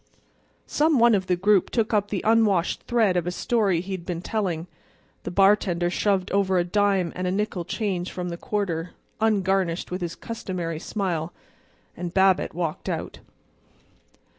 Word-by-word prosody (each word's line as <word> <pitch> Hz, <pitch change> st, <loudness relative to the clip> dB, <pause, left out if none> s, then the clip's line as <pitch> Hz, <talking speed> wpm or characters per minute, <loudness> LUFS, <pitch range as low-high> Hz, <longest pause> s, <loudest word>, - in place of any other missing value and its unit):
Some 305 Hz, 0 st, +2 dB
one 235 Hz, -1 st, +5 dB
of 190 Hz, -2 st, +1 dB
the 180 Hz, -, +2 dB
group 195 Hz, +1 st, +3 dB
took 225 Hz, -1 st, 0 dB
up 205 Hz, -1 st, +2 dB
the 205 Hz, -2 st, -3 dB
unwashed 215 Hz, -6 st, +3 dB
thread 225 Hz, -6 st, +2 dB
of 175 Hz, -1 st, 0 dB
a -, -, 0 dB
story 195 Hz, -3 st, +1 dB
he 190 Hz, +2 st, -8 dB
had 185 Hz, -2 st, -4 dB
been 175 Hz, -1 st, -4 dB
telling; 180 Hz, -7 st, -2 dB, 0.6 s
the -, -, -5 dB
bartender 180 Hz, -2 st, +3 dB
shoved 195 Hz, -1 st, 0 dB
over 190 Hz, -1 st, +2 dB
a 175 Hz, -, +3 dB
dime 195 Hz, -1 st, +1 dB
and 185 Hz, 0 st, -2 dB
a -, -, 0 dB
nickel 200 Hz, -2 st, -1 dB
change 185 Hz, -2 st, -2 dB
from 180 Hz, -1 st, -4 dB
the 170 Hz, -, -4 dB
quarter, 180 Hz, -4 st, -3 dB, 0.3 s
ungarnished 195 Hz, -6 st, +1 dB
with 180 Hz, +1 st, -3 dB
his 170 Hz, -1 st, -3 dB
customary 180 Hz, -7 st, -5 dB
smile; 175 Hz, -4 st, -3 dB, 0.6 s
and 175 Hz, 0 st, -6 dB
Babbitt 190 Hz, -3 st, +3 dB
walked 170 Hz, -3 st, -3 dB
out. -, -, -4 dB
190 Hz, 165 wpm, -25 LUFS, 175-205 Hz, 0.6 s, one